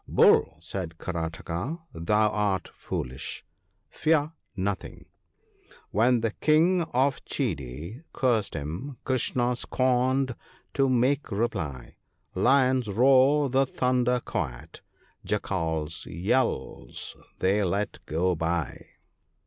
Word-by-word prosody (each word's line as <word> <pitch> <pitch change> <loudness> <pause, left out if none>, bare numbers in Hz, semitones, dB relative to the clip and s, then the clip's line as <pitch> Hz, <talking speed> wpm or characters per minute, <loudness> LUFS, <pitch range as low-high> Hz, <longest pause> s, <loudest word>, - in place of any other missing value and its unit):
1 - - -9
Bull,' 80 - +5
said 85 0 -5
Karataka, 85 - -4
' - - -33
thou 105 +6 +2
art 100 -4 -1
foolish; 65 +1 -5 0.4
fear 155 -1 +1 0.2
nothing,— 100 0 -3 0.9
"When 120 +3 +3
the 115 -1 0
King 165 - +3
of 135 +3 +1
Chedi( 80 - -3
M 160 - -19
) - - -46
cursed 120 -5 +1
him, 85 - -5
Krishna, 125 -1 +1
scorned 130 +1 +1 0.4
to 135 -1 +2
make 130 +3 +2
reply; 80 - -3 0.4
Lions 130 -2 +3
roar 135 +6 +5
the 135 +1 +3
thunder 125 -1 +1
quiet, 65 - -5 0.4
Jackals' 80 -1 -2
yd 105 - -1
Is - - -7 0.2
they 100 +3 +2
let 100 +3 -1
go 90 +4 +1
by.' 85 -2 -2
110 Hz, 110 wpm, -27 LUFS, 85-130 Hz, 0.9 s, Bull